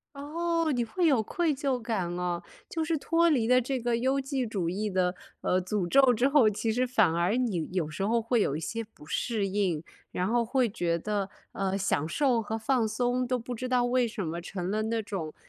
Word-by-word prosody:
哦， 330 +3 -1
你 245 -3 +1
会 345 +10 -1
有 270 -8 +4
愧 320 +8 0
疚 270 -2 -1
感 225 -6 -2
哦。 175 -1 -2 0.3
就 325 - -2
是 320 0 0
脱 335 +3 +2
离 250 -8 +2
了 250 +1 +5
这 260 +2 -2
个 240 0 0
优 260 +3 +1
绩 270 -1 -2
主 195 -7 -2
义 205 +4 -2
的， 185 -1 +1 0.3
呃， 185 - +1
诅 185 0 -1
咒 265 +5 +5
之 240 +3 +2
后， 275 -6 +5
其 215 +2 -1
实 250 +3 +1
反 220 -9 +3
而 175 +5 +1
你 220 -11 -1
有 180 -4 -1
时 155 +6 -3
候 230 +2 +2
会 230 0 +1
有 140 - +1
一 - - -2
些 225 +8 -3
不 210 -8 -17
适 215 +4 -1
应， 190 -5 0 0.3
然 180 - -1
后 235 +2 +2
会 250 +2 +1
觉 175 -5 -1
得， 200 +2 -2 0.2
呃， 195 0 -1
享 185 -5 0
受 250 - +2
和 220 +1 -3
放 230 0 +1
松 245 +3 0
都 255 0 +1
不 245 +1 -6
知 255 +2 -4
道 250 -1 +3
为 245 0 +2
什 215 -4 -4
么 165 +2 -4
成 180 +1 -4
了 215 +1 0
那 225 +1 -1
种 180 -7 -5
225 Hz, 240 characters per minute, -28 LUFS, 190-255 Hz, 0.3 s, 了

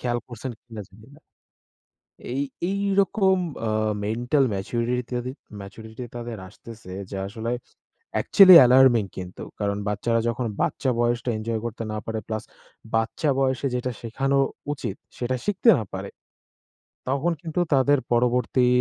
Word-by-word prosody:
খেয়াল 120 -1 -1
করসেন 120 +1 -6
কিনা 115 -3 -8
জানি 105 +5 -18
না। - - -20 1.1
এই 135 - 0 0.3
এই 200 +1 -1 0.2
রকম 190 0 +2 0.3
আ - - 0 0.4
মেন্টাল 120 +6 +1
ম্যাচুরিটি 120 +5 -1
তাদে 125 +1 -4 0.3
ম্যাচুরিটি 110 +4 -9
তাদের 120 -2 -5
আসতেসে 110 -4 -11 0.2
যে 100 - -4
আসলে 110 +3 -4 0.6
অ্যাকচুয়ালি 190 -3 +8
অ্যালার্মিং 125 -3 +6
কিন্তু 90 -1 -7 0.2
কারণ 100 -1 -1
বাচ্চারা 115 +3 0
যখন 120 +1 -2 0.2
বাচ্চা 135 - 0
বয়সটা 120 +1 +1
এনজয় 110 0 -3
করতে 115 0 -4
না - - -3
পারে, 110 -1 -3
প্লাস 110 -1 -3 0.5
বাচ্চা 115 +7 0
বয়সে 135 0 +1
যেটা 125 +1 -2
শেখানো 135 +4 0 0.3
উচিত, 145 - -5 0.2
সেটা 125 +1 -1
শিখতে 205 +3 +3
না - - -3
পারে। 95 +1 -5 1.0
তখন 140 +6 +1
কিন্তু 165 +1 -3
তাদের 140 +1 +4
পরবর্তী 125 +1 +2
120 Hz, 135 wpm, -24 LUFS, 110-135 Hz, 1.1 s, অ্যাকচুয়ালি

